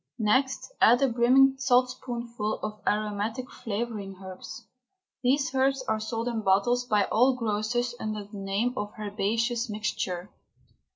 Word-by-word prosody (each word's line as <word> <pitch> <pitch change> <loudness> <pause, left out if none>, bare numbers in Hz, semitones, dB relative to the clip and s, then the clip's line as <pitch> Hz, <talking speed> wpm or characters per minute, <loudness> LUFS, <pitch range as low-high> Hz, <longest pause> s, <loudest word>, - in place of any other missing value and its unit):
Next 260 - +1
add 240 +4 +6
a - - +5
brimming 260 +3 +5
saltspoonful 245 -3 0
of 210 -1 -5
aromatic 215 +4 -1
flavouring 210 -3 -4
herbs. 190 -1 -9 0.6
These 270 +2 +1
herbs 270 0 +2
are 220 -4 -1
sold 225 +2 -3
in 230 -2 -1
bottles 220 +6 +2
by 210 -3 +3
all 250 +4 +4
grocers 235 +1 -1
under 215 -1 -3
the 205 0 -10
name 200 +5 -1
of 205 -2 -4
Herbaceous 225 +3 -1
Mixture. 200 -3 -3
230 Hz, 130 wpm, -27 LUFS, 210-250 Hz, 0.6 s, add